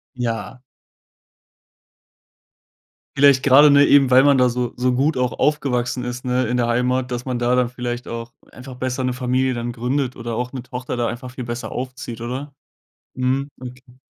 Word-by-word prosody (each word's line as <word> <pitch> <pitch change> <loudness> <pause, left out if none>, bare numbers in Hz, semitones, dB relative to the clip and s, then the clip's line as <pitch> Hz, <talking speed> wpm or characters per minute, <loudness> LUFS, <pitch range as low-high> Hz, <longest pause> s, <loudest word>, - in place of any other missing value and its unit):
Ja. 115 0 -4 2.5
Vielleicht 140 -1 +5
grade 145 +2 +7
nur 140 0 +6
eben, 140 -2 +5
weil 130 +1 +6
man 140 -2 +4
da 125 0 +4
so 125 0 -2
so 125 +1 +1
gut 140 +3 +1
auch 125 -2 0
aufgewachsen 125 -4 0
ist, 125 +1 -6
ne, 125 0 +1
in 120 +2 -1
der 120 - +1
Heimat, 125 +2 0
dass 125 0 -4
man 130 -2 -2
da 120 +1 +1
dann 125 -1 +2
vielleicht 120 -1 -5
auch 115 0 -6 0.2
einfach 130 +2 -10
besser 130 +1 -3
'ne 125 0 0
Familie 130 +1 0
dann 120 0 -3
gründet 125 +2 -2
oder 115 -1 -5
auch 125 +2 -3
'ne 130 -3 -6
Tochter 125 0 -6
da 120 - 0
einfach 120 +2 -6
viel 125 0 -7
besser 120 -1 -5
aufzieht, 125 -2 -6
oder? 130 +4 -6 0.6
Mhm. 130 +2 -1
Okay. 125 0 -12
125 Hz, 180 wpm, -21 LUFS, 120-130 Hz, 2.5 s, grade